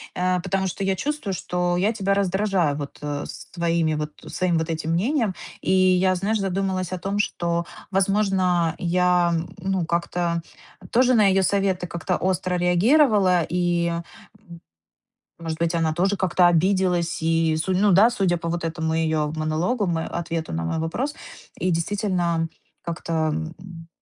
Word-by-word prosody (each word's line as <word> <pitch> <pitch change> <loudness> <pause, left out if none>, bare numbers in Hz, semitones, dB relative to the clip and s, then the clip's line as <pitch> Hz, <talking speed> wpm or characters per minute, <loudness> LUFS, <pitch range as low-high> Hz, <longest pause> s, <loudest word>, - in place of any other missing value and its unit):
Э, 180 0 +1
потому 190 +1 -1
что 190 +2 -4
я 195 0 +1
чувствую, 285 -4 -2
что 180 0 -1
я 205 +5 +1
тебя 195 -2 0
раздражаю 190 -4 +1
вот, 145 -1 -7
э, 145 -1 -3
с - - -9
твоими 170 -2 0
вот 150 0 -3 0.2
своим 180 -3 0
вот 160 +1 -2
этим 160 0 -2
мнением". 225 - +1 0.3
И - - -1
я, 185 0 +4
знаешь, 205 +4 0
задумалась 190 -1 -1
о 185 - -2
том, 195 +3 -2
что, 170 -4 -1 0.3
возможно, 190 -3 +2
я, 180 0 +2 0.3
ну, 190 -1 -1
как-то 170 0 -1 0.5
тоже 255 +1 +4
на 215 -4 +5
ее 190 0 +3
советы 190 -1 +1
как-то 170 +1 -2
остро 185 0 -1
реагировала. 185 - +4
И, 175 -1 +1
м, 170 0 -2 1.4
может 165 -1 -4
быть, 170 +1 +1
она 160 -2 +1
тоже 195 +4 +1
как-то 180 -1 +3
обиделась. 175 -1 +1
И, 165 0 +2
судя 185 +3 0
ну 210 - +4
да, 200 +6 +6
судя 195 -7 0
по 170 0 -4
вот 170 0 -2
этому 160 -1 -2
ее 160 -2 0
монологу, 160 +9 0
м, 170 -3 0
э, - - -3
ответу 165 -1 -4
на 80 +1 -2
мой 80 - -2
вопрос, 245 - -2 0.5
и 185 - +1
действительно 170 -2 0 0.3
как-то, 170 0 -5
м 160 0 -1
м, 170 -3 -11
180 Hz, 160 wpm, -23 LUFS, 165-195 Hz, 1.4 s, да